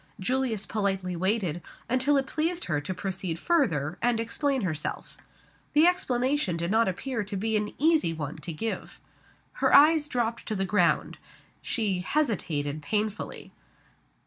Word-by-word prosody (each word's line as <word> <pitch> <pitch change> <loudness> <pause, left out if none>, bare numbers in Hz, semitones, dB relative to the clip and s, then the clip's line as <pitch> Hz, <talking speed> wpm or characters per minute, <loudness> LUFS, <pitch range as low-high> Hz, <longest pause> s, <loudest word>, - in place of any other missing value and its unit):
Julius 235 0 0
politely 195 -4 -1
waited, 185 -2 0 0.3
until 260 +3 +3
it 270 - +1
pleased 330 +5 -1
her 150 -4 -1
to 145 - -4
proceed 185 -3 -3
further, 175 - +1
and 240 -1 +2
explain 265 +4 0
herself 155 -6 -4 0.6
The 305 +2 +6
explanation 265 - +1
did 170 +2 -2
not 225 0 +3
appear 225 +5 -2
to 200 0 -5
be 220 +3 0
an 210 0 0
easy 315 - +3
one 155 -3 -5
to 170 - -6
give. 220 +8 -5 0.6
Her - - +3
eyes 300 +1 +6
dropped 235 -3 -2
to 215 - -2
the 195 -1 0
ground. 185 -3 +1 0.4
She 205 -7 0
hesitated 170 - -1
painfully. 210 +5 -3
215 Hz, 145 wpm, -27 LUFS, 180-265 Hz, 0.6 s, The